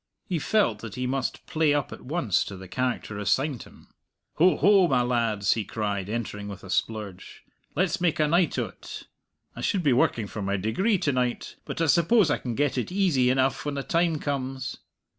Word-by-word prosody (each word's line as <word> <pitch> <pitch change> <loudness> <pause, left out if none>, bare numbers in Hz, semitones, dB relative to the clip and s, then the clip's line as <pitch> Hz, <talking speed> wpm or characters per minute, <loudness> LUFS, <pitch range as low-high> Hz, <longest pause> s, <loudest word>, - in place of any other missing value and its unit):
He 175 -3 -2
felt 195 - +1
that 110 -2 -8
he 125 - -2
must 130 +1 -2
play 155 -2 +2
up 145 - -1
at - - -9
once 135 - 0
to 100 - -7
the 95 0 -10
character 125 -2 -2
assigned 130 +4 0
him. - - -16 0.5
"Ho, 180 +3 +5
ho, 195 -2 +5
my 125 -5 +2
lads!" 115 -5 +1
he 110 - -2
cried, 100 -2 -3
entering 105 -2 -4
with, 100 -1 -8
a 95 - -8
splurge; 105 -4 -3 0.3
"let's 185 +2 0
make 170 -3 +1
a 155 - +3
night 170 +2 +2
o't. - - -5 0.5
I - - -7
should 195 -5 0
be 140 -4 +4
working 120 -3 +2
for 100 +2 -6
my 100 +1 -1
degree 185 - +1
to 145 - 0
night, 125 -2 -2
but - - -5
I - - +3
suppose 170 - +4
I - - +1
can 120 -3 -4
get 140 -1 +1
it 125 - -4
easy 175 -10 +2
enough 130 +1 +1
when 145 -1 -3
the 140 - -3
time 165 0 +1
comes." 135 -2 -3
130 Hz, 200 wpm, -26 LUFS, 110-160 Hz, 0.5 s, Ho